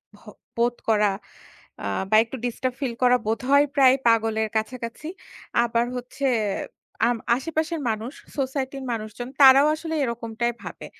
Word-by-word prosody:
ভ - - -20 0.4
বোধ 240 +1 +1
করা 210 -1 +4 0.7
আ - - -5 0.2
বা 215 - +3
একটু 235 +3 -8
disturb 250 +1 -2
feel 250 -4 -1
করা 250 0 +6
বোধহয় 270 +6 +3
প্রায় 265 -2 +6
পাগলের 225 -1 +2
কাছাকাছি। 230 +5 -5 0.6
আবার 235 0 +1
হচ্ছে 250 +3 -5 0.8
আম 240 -1 +1 0.2
আশেপাশের 320 +4 -2
মানুষ 225 +4 -3 0.2
society 265 0 -2
র - - -7
মানুষজন 220 +2 -6
তারাও 275 +2 +8
আসলে 320 +1 -6
এরকমটাই 235 0 -2
ভাবে। - - -8
245 Hz, 135 wpm, -24 LUFS, 230-270 Hz, 0.8 s, তারাও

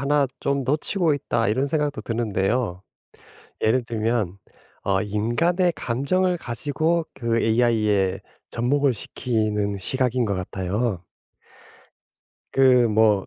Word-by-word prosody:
1 140 0 +2
좀 140 -1 0
놓치고 155 +3 +1
있다.' 115 -4 -1
이런 130 +6 +1
생각도 150 -1 -1
드는데요. 105 -3 -1 0.8
예를 125 +4 +3
들면 110 -4 -1 0.5
어 95 0 +1
인간의 120 - +1
감정을 175 +10 0
가지고 155 +6 -1
그 115 -2 0
ai에 110 -5 +2 0.3
접목을 135 +3 +1
시키는 105 -3 -1
시각인 125 +3 0
것 100 - -1
같아요. 95 +2 -2 1.5
그 130 -2 +5
뭐 105 -2 +3
120 Hz, 215 characters per minute, -23 LUFS, 105-140 Hz, 1.5 s, 그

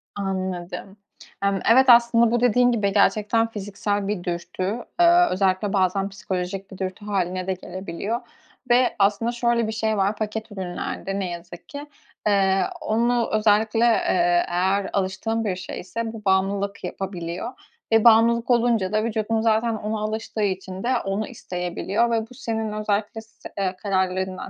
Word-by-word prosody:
Anladım. 190 0 -4 0.5
Hımm, 200 -1 +1
evet, 260 +3 +6
aslında 235 -1 +6
bu 240 - +2
dediğin 245 +1 +4
gibi 200 -4 0
gerçekten 215 +2 +3
fiziksel 205 -1 -3
bir 200 -4 -2
dürtü. 175 +1 -4 0.4
Iıı, 345 +1 +6
özellikle 190 +2 +1
bazen 195 +1 +1
psikolojik 195 0 -5
bir 190 - -9
dürtü 190 +2 -5
hâline 185 -2 -2
de 190 - +1
gelebiliyor 185 +5 -5 0.5
ve 245 +1 +4
aslında 205 +4 +2
şöyle 235 -1 +1
bir - - -2
şey 220 -1 -1
var 200 +2 +1
paket 220 +1 -4
ürünlerde 190 +1 -4
ne 185 -2 -2
yazık 175 0 -9
ki; 285 0 -7 0.4
eee, 195 -1 +3 0.2
onu 235 +2 +1
özellikle, 215 +1 +3
eee, 175 -6 +3
eğer 190 +3 0
alıştığın 200 +4 -1
bir 190 -3 0
şeyse 220 +5 -5
bu 215 -2 -10
bağımlılık 195 +1 0
yapabiliyor 180 +2 -5 0.4
ve 225 -1 +5
bağımlılık 235 +1 +5
olunca 230 -5 +2
da 215 0 +2
vücudun 220 0 -1
zaten 225 0 +2
ona 215 0 -3
alıştığı 215 0 -3
için 190 0 -3
de 250 0 +2
onu 195 +3 -2
isteyebiliyor 195 +1 -2
ve 225 -1 +2
bu - - -13
senin 225 -4 -3
özellikle 210 +1 -2
s 225 0 -13
eee, 190 -2 -1
kararlarından, 190 -1 -1
205 Hz, 150 wpm, -23 LUFS, 190-225 Hz, 0.5 s, evet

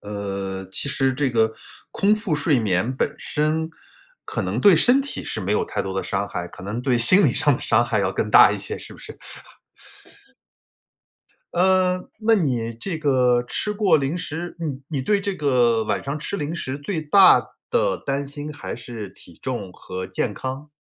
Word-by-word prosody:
呃， 100 -2 -5
其 140 - -2
实 135 -1 +1
这 135 0 -1
个， 110 -1 +2 0.4
空 205 +2 +2
腹 210 -7 -2
睡 145 -2 +1
眠 105 +5 0
本 - - -1
身， 155 +2 -1 0.6
可 - - -4
能 - - -2
对 200 -4 +7
身 245 - +4
体 280 - -5
是 110 - -3
没 100 +2 -2
有 - - +1
太 - - -3
多 95 - -5
的 95 - -2
伤 100 +1 -2
害， 85 - -5
可 - - -13
能 105 +5 -4
对 125 -2 +1
心 185 - +8
理 125 - +3
上 145 0 +3
的 - - -6
伤 120 +2 +2
害 110 -3 -1
要 95 -1 -1
更 105 - -2
大 - - +8
一 - - -4
些 - - -4
是 - - -10
不 - - -14
是？ - - -10 2.4
嗯， 185 0 +2
那 225 +1 +3
你 125 - -1
这 165 +8 -5
个 125 -4 +2
吃 210 - -2
过 205 -5 +3
零 140 +5 -2
食， 175 0 -5
你 140 -5 -4
你 140 -5 -3
对 205 +6 +1
这 195 0 -3
个 120 -7 +2
晚 - - -2
上 140 +2 -3
吃 165 +6 -3
零 150 -1 -4
食 135 -4 -4
最 160 +4 -3
大 185 +5 +6 0.3
的 - - +1
担 140 +1 -1
心 145 +2 -7
还 145 - -7
是 115 -4 -8
体 85 - -15
重 110 -8 -4
和 95 0 -7
健 95 +2 -2
康？ 135 +6 -6
135 Hz, 205 characters per minute, -22 LUFS, 110-165 Hz, 2.4 s, 心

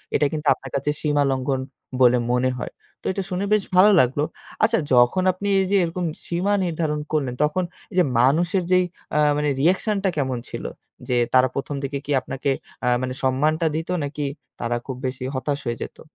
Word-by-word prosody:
এটা 150 - +3
কিন্তু 155 -1 -3
আপনার 135 - -10
কাছে 140 +1 -1
সীমা 145 -2 +2
লঙ্ঘন 130 0 -1 0.4
বলে 125 0 +6
মনে 125 +1 +2
হয়। - - -5 0.3
তো - - -25
এটা 195 0 -2
শুনে 185 +2 -1
বেশ 215 -2 +3
ভালো 195 +3 +7
লাগলো। 135 +4 +2 0.4
আচ্ছা 225 +1 +4
যখন 125 +9 +4
আপনি 185 +3 -5
এই 190 - +2
যে - - +4
এরকম 175 +1 -2 0.2
সীমা 180 +4 0
নির্ধারণ 160 -3 -1
করলেন, 140 -5 0
তখন 150 +5 +1 0.3
এই - - -12
এইযে 180 0 +4 0.2
মানুষের 170 +9 +3
যেই 185 0 +5 0.3
আ - - +4 0.2
মানে 150 0 +1
reaction 190 +6 +2
টা 195 - +3
কেমন 130 -3 0
ছিল? - - -6 0.5
যে 125 - +2 0.2
তারা 130 0 +6
১ম 140 +1 -3
দিকে 140 +1 -2
কি 145 - -4
আপনাকে 135 +2 -3 0.4
আ - - +1
মানে 130 0 -2
সম্মানটা 150 +5 +1
দিতো 165 +3 -2
নাকি 145 +1 -3 0.3
তারা 120 0 -1
খুব 130 -2 -5
বেশি 130 0 -3
হতাশ 140 +2 -1
হয়ে 120 -1 -2
যাইতো? - - -7
150 Hz, 195 wpm, -23 LUFS, 130-180 Hz, 0.5 s, ভালো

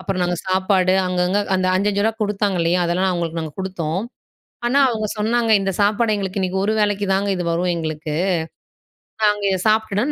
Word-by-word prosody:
அப்புறம் 185 -2 -2
நாங்க 175 0 0
சாப்பாடு, 185 0 +2
அங்கங்க 180 +2 +1 0.2
அந்த 185 0 +1
5,5 200 +1 +1
ரூவா 225 - +1
குடுத்தாங்க 205 -2 0
இல்லயா! 170 +2 +2
அதெல்லாம் 180 +3 +1
அவுங்களுக்கு 170 -1 -2
நாங்க 160 -2 -6
குடுத்தோம். 180 -2 -3 0.7
ஆனா, 255 +4 +2
அவுங்க 220 -3 -2
சொன்னாங்க, 230 +2 +1
"இந்த 195 - -1
சாப்பாடு 215 +2 +2
எங்களுக்கு 195 -1 -3
இன்னக்கி 185 0 -1
ஒரு 215 - +1
வேளைக்கி 205 -1 0
தாங்க 195 +1 0
இது 175 - -3
வரும் 175 +2 0
எங்களுக்கு. 155 -2 -4 1.1
நாங்க 210 -1 +2
இத 190 - +1
சாப்பிட்டுட்டோன். 220 +4 +1
190 Hz, 170 wpm, -20 LUFS, 180-210 Hz, 1.1 s, சாப்பாடு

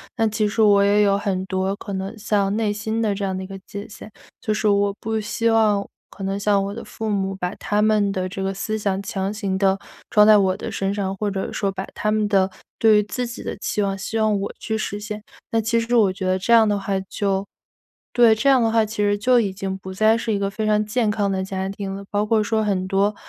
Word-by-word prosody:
那 225 - +1
其 215 0 0
实 220 +2 0
我 200 -2 +5
也 205 +1 +4
有 200 -1 +3
很 190 -2 -2
多 190 +1 -1
可 205 0 -7
能 195 +3 -4
像 205 -1 0
内 215 -2 0
心 220 +2 -2
的 215 -2 +1
这 200 0 -4
样 190 -1 -2
的 190 - -4
一 185 - -7
个 195 -1 -8
界 200 +2 -8
限， 215 0 -12 0.3
就 215 - 0
是 215 0 0
我 200 -1 +2
不 220 0 -2
希 230 +2 -1
望 215 -3 +3 0.2
可 195 - -10
能 195 +1 -2
像 200 -1 +2
我 200 +1 -4
的 230 - -7
父 220 - -6
母 195 -1 -1
把 180 0 -3
他 210 0 -1
们 210 -2 +3
的 185 -2 -2
这 195 +1 -6
个 190 0 -1
思 215 +3 -3
想 195 -2 -1
强 195 0 -2
行 200 -3 -2
地 195 0 +2 0.3
装 210 0 +6
在 215 0 +8
我 190 -1 +2
的 - - -6
身 195 0 -1
上， 195 -2 -2
或 210 +1 -1
者 190 -1 -3
说 195 -1 -1
把 190 0 -5
他 210 - -2
们 215 -1 +1
的 195 -2 +3 0.3
对 220 -2 +6
于 210 - +3
自 245 +4 -3
己 235 - -8
的 - - -4
期 210 - -2
望 195 -1 -1
希 215 +4 -4
望 215 -2 +2
我 200 - -3
去 220 - -3
实 205 -1 -3
现。 210 0 -6 0.3
那 225 0 +2
其 230 +2 +1
实 230 +1 0
我 205 -5 +4
觉 190 0 -5
得 185 0 +1
这 200 - -2
样 225 -1 +7
的 205 -1 +1
话 195 -1 -1
就 195 -1 -1 0.7
对， 235 -2 +6
这 275 +5 +2
样 260 -3 +5
的 225 -1 +2
话 225 -1 +4
其 220 +1 -8
实 205 0 +2
就 245 +4 +4
已 200 -4 -1
经 190 0 -4
不 190 0 -8
再 215 +3 +3
是 225 -1 -2
一 200 - 0
个 195 0 0
非 215 +2 -3
常 210 0 +2
健 215 0 +1
康 205 -2 0
的 190 -1 -1
家 190 0 -3
庭 195 -1 -5
了。 200 - -7
包 205 0 0
括 215 0 +2
说 220 +1 0
很 190 -3 -1
多， 200 +2 +1
205 Hz, 285 characters per minute, -22 LUFS, 195-215 Hz, 0.7 s, 在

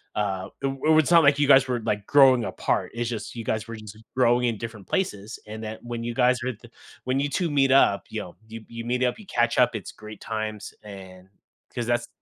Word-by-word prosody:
Uh, 95 -3 -2
i - - +2
i 135 +4 +2
it's 155 - +1
not 170 -2 +7
like 145 0 +4
you 145 - +3
guys 135 -1 +6
were, 125 -2 -1
like, 105 -1 -2
growing 135 -4 +6
apart, - - -2
it's 120 0 -2
just, 110 0 -6
you 115 - -5
guys 110 +1 -2
were 115 - -6
just 110 -1 -11 0.2
growing 125 0 +3
in 115 -3 -1
different 115 -4 -8
places, 105 - -3
and 110 +1 -7
that 110 0 -6
when 120 -1 -5
you 120 0 -3
guys 125 -1 +3
were 130 - -1
at 110 - -14
the 120 - -14 0.4
when 130 +1 0
you 145 +1 0
2 170 +4 -1
meet 135 -2 +3
up, 115 -7 +4
you 110 - -4
know, 90 - -10
you 110 0 -9
you 115 0 -7
meet 125 +1 0
up, 125 - 0
you 215 - -12
catch 120 -5 +1
up, 120 -1 +4
it's 105 - -6
great 105 -1 -11
times, 110 -1 -5
and 95 -2 -12 0.4
'cause 120 -1 -3
that's 120 0 0
120 Hz, 245 wpm, -25 LUFS, 110-130 Hz, 0.4 s, not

